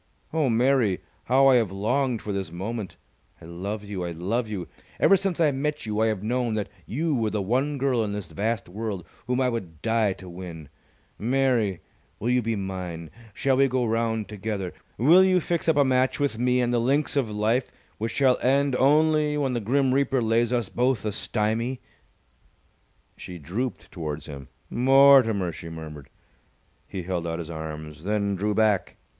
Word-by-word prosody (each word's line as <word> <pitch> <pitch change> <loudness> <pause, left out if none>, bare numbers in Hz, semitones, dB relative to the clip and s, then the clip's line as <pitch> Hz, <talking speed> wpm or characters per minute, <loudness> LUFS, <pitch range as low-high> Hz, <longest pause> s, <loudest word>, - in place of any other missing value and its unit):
Oh, 155 -4 +2
Mary, 120 -4 +2 0.3
how 135 +2 +4
I 135 -2 +7
have 110 -6 +1
longed 120 +5 0
for 105 - -3
this 95 -4 -3
moment! 100 +4 -5 0.4
I - - -13
love 100 +5 -5
you! 100 -3 -5
I 85 - -3
love 100 +8 -2
you! 95 -5 -4 0.3
Ever 195 - +6
since 195 -2 -1
I 155 -3 +4
met 150 +1 -2
you 105 -1 -2
I 110 - +3
have 105 -3 -2
known 120 0 0
that 105 -2 -2 0.2
you 155 +6 -1
were 115 -5 +1
the 105 0 -2
one 130 +9 0
girl 130 -4 +1
in 105 - -3
this 100 -5 -6
vast 110 +6 -2
world 100 -1 -5 0.2
whom 125 +1 0
I 130 - +2
would 95 -11 -5
die 110 -3 +2
to 95 - -13
win! 85 -4 -9 0.5
Mary, 120 -6 +1 0.4
will 120 +4 -1
you 125 0 +3
be 115 0 -1
mine? 90 -4 -5 0.2
Shall 135 -1 +1
we 135 0 +5
go 130 -1 0
round 115 -1 0
together? 100 -3 -4 0.2
Will 165 - +6
you 185 -1 +4
fix 170 0 -1
up 160 - +3
a 145 - +5
match 130 0 +2
with 140 -6 0
me 125 0 +2
on 120 - 0
the 120 - +2
links 140 +6 +1
of 135 -6 +1
life 110 +4 0 0.3
which 115 +2 -2
shall 130 -3 +3
end 140 +1 +2
only 150 +1 +3
when 135 -3 0
the 120 - 0
Grim 130 +4 +1
Reaper 135 -1 +2
lays 115 +1 +2
us 120 -4 0
both 125 -1 0
a 105 - 0
stymie?" 115 +5 -1 1.4
She 90 - -9
drooped 105 - -4
towards 75 -5 -5
him. 70 -2 -9 0.2
"Mortimer!" 130 -7 +5
she 85 0 -9
murmured. 75 -4 -9 0.8
He 95 -2 -5
held 85 -1 -3
out 80 0 -2
his 85 -1 -6
arms, 80 -1 -7
then 100 0 0
drew 105 +2 -1
back. 105 -3 +1
115 Hz, 185 wpm, -25 LUFS, 95-130 Hz, 1.4 s, I